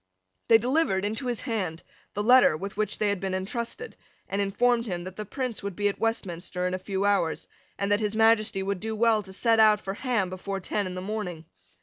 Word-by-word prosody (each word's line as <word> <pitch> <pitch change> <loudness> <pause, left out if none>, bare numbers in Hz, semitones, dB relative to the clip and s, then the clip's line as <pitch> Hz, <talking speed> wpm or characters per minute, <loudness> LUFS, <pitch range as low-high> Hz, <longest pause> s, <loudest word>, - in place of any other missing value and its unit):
They 225 - +8
delivered 240 -5 +1
into 220 +5 -3
his 240 -2 -2
hand 190 - -3 0.3
the 205 - -1
letter 245 -8 +6
with 195 +4 -6
which 210 0 -1
they 210 - +1
had 200 -2 0
been 190 0 -2
entrusted, 235 - -4 0.3
and 200 +1 -1
informed 230 +4 +1
him 175 -3 -3
that 185 +1 -8
the 215 - -5
Prince 255 +1 -4
would 200 -2 -5
be 205 +2 +1
at 200 - -6
Westminster 180 -5 -2
in 180 - -1
a 185 - -2
few 195 +1 -2
hours, 195 -5 +1 0.3
and 200 0 -1
that 205 - +4
His 210 -1 -2
Majesty 220 -3 +3
would 200 -1 -2
do 220 +2 -3
well 225 -1 +3
to 190 -1 -13
set 225 +3 +2
out 215 -1 +6
for 195 -1 -5
Ham 215 -5 -1
before 195 +1 -4
ten 200 +1 -2
in 180 - -6
the 185 - -4
morning. 185 -5 -4
205 Hz, 225 wpm, -27 LUFS, 190-225 Hz, 0.3 s, They